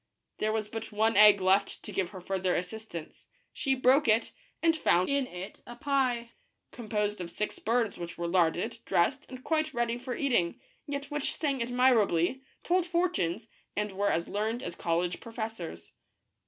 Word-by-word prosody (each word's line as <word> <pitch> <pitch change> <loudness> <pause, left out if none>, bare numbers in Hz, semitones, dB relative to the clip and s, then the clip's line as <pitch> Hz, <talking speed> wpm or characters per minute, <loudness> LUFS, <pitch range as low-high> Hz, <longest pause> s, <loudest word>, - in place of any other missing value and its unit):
There 215 - +1
was 215 -1 -1
but 225 +1 -6
one 220 +2 +2
egg 210 -1 +8
left 195 +1 +2
to - - -7
give 185 -3 -1
her 190 -3 -9
further 185 0 0
assistance. 180 -2 -6 0.3
She 270 -2 +1
broke 260 +3 +4
it, 225 +1 +3 0.3
and 330 -1 +4
found 180 - +3
in 280 -2 +1
it 180 0 -8
a 240 - -8
pie, 250 -3 0 0.4
composed 210 -4 -2
of 170 - -5
six 210 +4 -3
birds 230 -1 0
which 170 -1 -6
were 170 - -2
larded, 170 -1 +1
dressed, 255 +10 +1
and 255 -1 -9
quite 310 -2 0
ready 235 0 0
for 250 0 -4
eating, 235 -12 +1 0.3
yet 280 0 -4
which 295 -1 -1
sang 280 -5 -1
admirably, 245 -4 +3 0.2
told 360 0 +2
fortunes, 245 - 0 0.3
and 210 0 -1
were 200 +1 0
as 170 +1 0
learned 220 +4 -2
as - - -4
college 170 +1 -1
professors. 220 - -6
220 Hz, 170 wpm, -30 LUFS, 185-255 Hz, 0.4 s, egg